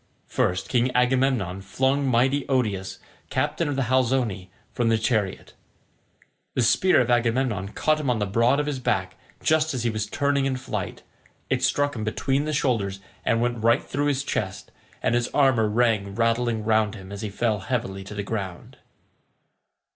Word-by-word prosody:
First 90 +1 0
King 125 0 +2
Agamemnon 125 -7 +1
flung 135 +7 0
mighty 130 +3 +2
Odius, 105 -8 0 0.3
captain 170 - 0
of 145 - -1
the 135 - +1
Halizoni, 120 -6 0 0.2
from 120 -2 +1
his 115 -1 +3
chariot. 110 -4 -1 1.0
The 125 - +2
spear 185 +10 +4
of 125 0 0
Agamemnon 120 -4 +1
caught 155 0 +1
him 145 -4 -2
on 120 - +2
the 105 - 0
broad 115 +7 +2
of 150 - 0
his 145 -3 -3
back, 95 -7 -1 0.3
just 155 -2 +2
as 120 - -2
he 120 - +1
was 110 -1 -2
turning 140 +3 +1
in 135 -1 0
flight; 130 - -5 0.5
it - - +1
struck 145 -1 +1
him 110 - -4
between 135 +6 0
the 155 - -2
shoulders 105 -9 0 0.2
and 115 0 +1
went 120 -2 -1
right 115 +1 +4
through 145 +1 -1
his 140 -1 0
chest, 95 -8 -3 0.3
and - - +2
his 120 0 +1
armour 130 -6 +4
rang 105 -3 +1
rattling 115 0 +1
round 110 -1 +2
him 95 -2 -10
as 100 - -6
he 110 - -3
fell 110 +1 0
heavily 95 -3 -3
to 105 - -8
the 100 - -3
ground. 100 -4 -5
120 Hz, 175 wpm, -25 LUFS, 105-130 Hz, 1.0 s, spear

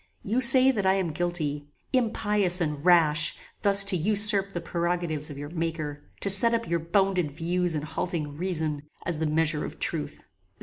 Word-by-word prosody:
"You 230 +6 -1
say 260 +1 +8
that 205 -6 -2
I 190 - +3
am 185 -4 -2
guilty. 155 -3 -3 0.3
Impious 210 -6 +1
and 150 -4 -3
rash! 165 -3 +3 0.3
thus 200 -1 +4
to 200 -1 +1
usurp 200 +2 +3
the 175 - -5
prerogatives 170 -2 -3
of 145 - -9
your 145 +1 -8
Maker! 160 -3 -5
to 200 - -1
set 230 +4 +4
up 230 0 -4
your 170 0 -1
bounded 180 0 0
views 170 +3 -2
and 150 - -4
halting 155 -2 -4
reason, 160 -4 -3 0.2
as 170 -2 -1
the 160 - -1
measure 155 0 0
of - - -8
truth! - - -3
175 Hz, 175 wpm, -25 LUFS, 155-195 Hz, 0.3 s, say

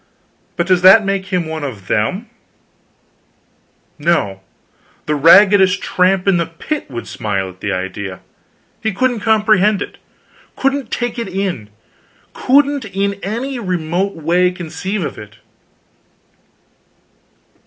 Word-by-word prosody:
But 170 - 0
does 185 -1 +2
that 195 +3 +7
make 195 -1 -2
him 180 -3 -1
one 160 -1 -5
of 110 -9 -6
them? 185 - -1 1.7
No; 145 - 0 0.6
the 150 - 0
raggedest 190 +5 +6
tramp 185 +1 +1
in 195 -2 +4
the 170 -1 -1
pit 225 - -5
would 120 -3 -6
smile 100 -3 -3
at 95 0 -15
the 100 - -2
idea. 95 0 -5 0.6
He 220 - -1
couldn't 245 +3 0
comprehend 215 -2 +3
it; - - -7 0.6
couldn't 270 -2 -1
take 240 0 -3
it 230 - -3
in; 185 - -3 0.6
couldn't 280 -1 +2
in 200 0 -1
any 245 +6 -4
remote 180 -1 -2
way 175 +3 +2
conceive 180 +2 -4
of - - -6
it. 105 +1 -12
185 Hz, 120 wpm, -17 LUFS, 155-210 Hz, 1.7 s, that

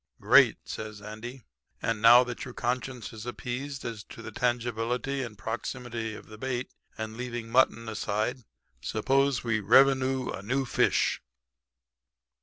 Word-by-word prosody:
"'Great,' - - +6
says 110 -1 -6
Andy. 110 +4 -8 0.4
'And 115 -2 -1
now 120 +2 +9
that 125 -1 -6
your 125 - -8
conscience 125 -2 -3
is 110 +1 -8
appeased 135 +3 -5
as 115 -3 -5
to 115 - -11
the 110 - -7
tangibility 120 +3 -1
and 115 -5 -6
proximity 115 +1 -4
of - - -11
the 110 0 -12
bait, 130 -1 -3 0.3
and 110 0 -5
leaving 120 -2 -5
mutton 115 -2 +3
aside, 110 +3 -1 0.4
suppose 135 - +1
we 115 -3 +1
revenoo 130 +3 +4
a - - -8
noo 130 +6 0
fish.' - - +2
120 Hz, 140 wpm, -28 LUFS, 110-130 Hz, 0.4 s, now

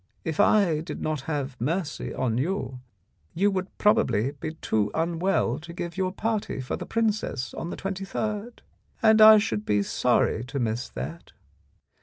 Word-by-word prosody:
If 160 -1 -4
I 185 -8 +4
did 160 - -6
not 155 -3 -2
have 135 -5 -3
mercy 165 +5 -2
on 125 -2 -1
you, 140 -4 -2 0.6
you 200 +4 +3
would 190 0 -4
probably 125 - +2
be 155 +2 -6
too 110 -9 0
unwell 170 +4 0
to 170 +2 -10
give 170 -1 -5
your 185 -1 0
party 215 -4 -2
for 130 - -3
the - - -7
princess 210 - -1
on 170 - -5
the - - -5
23rd, 205 +4 -4 0.4
and 220 -1 +6
I 215 0 +10
should 110 - -1
be 105 -1 +1
sorry 110 - +1
to 135 +3 -5
miss 120 -1 -1
that. 75 +7 -7
165 Hz, 160 wpm, -26 LUFS, 125-195 Hz, 0.6 s, I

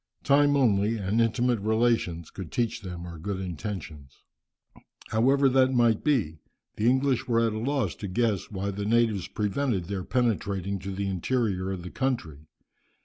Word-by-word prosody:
Time 145 +1 +4
only, 110 -3 +2
and 105 +3 0
intimate 120 +1 +1
relations, 110 -6 0
could 95 -5 -8
teach 115 -2 -1
them 90 -3 -7
our 85 -2 -8
good 95 +3 -4
intentions." 85 -6 -7 0.9
However 135 +5 +3
that 130 0 +3
might 115 -3 +3
be, 105 - +1 0.4
the 110 +3 +2
English 130 0 +1
were 115 -2 +2
at 110 - 0
a 110 - -3
loss 130 - 0
to 100 - -5
guess 110 0 0
why 100 0 -3
the 100 +1 -4
natives 110 -4 +2
prevented 105 -2 -1
their 95 0 -4
penetrating 100 -5 -1
to 100 +2 -6
the 100 +1 -3
interior 95 0 -1
of 90 -2 -5
the 90 - -7
country. 120 - -2
105 Hz, 160 wpm, -27 LUFS, 95-120 Hz, 0.9 s, Time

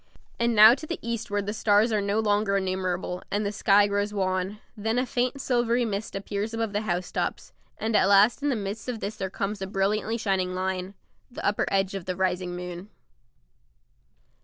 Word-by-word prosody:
And 235 0 +2
now 215 +2 +9
to 280 +4 -6
the 335 - -3
eastward 215 -3 -2
the 205 - -2
stars 215 +1 +3
are 215 -1 +1
no 200 +2 0
longer 205 -2 +2
innumerable, 185 -1 -2
and 205 +1 -1
the 200 - -1
sky 205 -1 +4
grows 205 0 -1
wan. 185 +1 -1 0.2
Then 220 +2 -1
a 250 - +2
faint 255 +2 -1
silvery 240 -2 +1
mist 210 -1 -4
appears 205 +3 -3
above 225 -2 -2
the 205 - 0
housetops, 180 -4 -3 0.2
and 220 0 -1
at 190 - +4
last 205 +6 +5
in 290 - +1
the 265 - +1
midst 205 +2 -5
of 235 -3 -3
this 210 +1 -5
there 190 -1 -3
comes 200 +2 -3
a 190 - -3
brilliantly 210 +4 0
shining 190 -4 -1
line 185 +1 -3 0.3
the 275 +6 -7
upper 205 - +1
edge 195 -1 +1
of 195 -3 -5
the 185 - -3
rising 180 -1 -1
moon. 180 +2 -7
205 Hz, 190 wpm, -26 LUFS, 190-220 Hz, 0.3 s, now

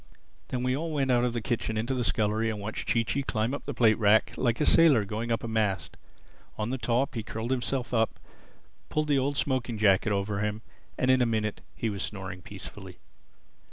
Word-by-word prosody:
Then 125 -1 -3
we 125 0 +1
all 160 +3 -3
went 135 -3 +1
out 120 -1 +3
of 125 -1 0
the 120 -2 -3
kitchen 115 -2 -1
into 115 +5 -1
the 125 -2 -1
scullery 110 +1 +1
and 110 -2 -3
watched 105 +2 -5
Chee 115 - +3
Chee 140 +5 -1
climb 110 -3 -1
the 145 - -3
plate 110 -3 +4
rack 110 0 +4
like 120 -3 0
a 150 - +2
sailor 145 -11 +6
going 110 +4 -3
up 115 - 0
a - - -3
mast. 110 -4 -1 0.6
On 110 +2 -2
the 130 - -2
top, 120 +4 0
he 115 - -3
curled 115 +3 -4
himself 130 0 -1
up, 110 -1 +1 0.7
pulled 155 0 -1
the 140 -2 +4
old 140 +2 -1
smoking 130 -5 0
jacket 105 0 +3
over 100 0 -1
him, 105 +1 -2 0.3
and 130 - +3
in 130 -1 +4
a 120 - +3
minute 110 -2 -1
he 115 - -1
was 100 -1 -5
snoring 95 -3 -5
peacefully. - - -10
115 Hz, 210 wpm, -28 LUFS, 110-130 Hz, 0.7 s, sailor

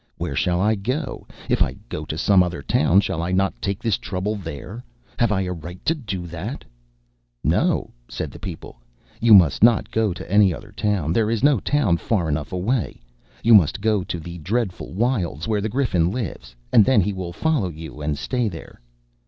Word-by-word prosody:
"Where - - -3
shall 90 -1 +1
I 105 +4 +3
go? 125 +9 -3 0.2
If - - +1
I - - +2
go 75 - -5
to 75 - -5
some 95 +2 +4
other 90 -5 -2
town, 75 +7 +3
shall 85 - -2
I 85 +2 -2
not 95 +1 +1
take 100 0 -3
this 115 -4 +1
trouble 100 +3 -3
there? 95 - -7 0.4
Have 120 -3 +3
I 95 -2 +1
a 90 -1 -2
right 85 +2 -9
to 165 - +3
do 110 - -5
that?" 90 - -6 0.8
"No," - - +1 0.2
said - - -5
the - - -12
people, 85 -9 -8 0.4
"you 115 -2 +7
must 85 -7 +5
not 115 -2 +4
go 110 -2 +1
to 90 +2 -7
any 100 -2 +5
other 105 -1 -12
town. 100 -7 -1
There 110 +2 +2
is 115 +1 -1
no 145 -5 +5
town 115 -8 +1
far 90 0 -1
enough 75 +1 -2
away. 95 - -1 0.4
You 115 - +6
must 90 -3 +5
go 105 -2 +1
to 85 - -4
the 85 +2 -8
dreadful 100 +3 -2
wilds 95 - -1
where 105 -2 0
the 110 - -2
Griffin 105 -9 +1
lives; 90 - -5 0.2
and 110 - +8
then 125 -2 +4
he 100 +3 -1
will 90 -2 -5
follow 140 - 0
you 80 -2 -9
and 75 0 -2
stay 120 - -1
there." 80 -8 -11
95 Hz, 200 wpm, -22 LUFS, 85-110 Hz, 0.8 s, and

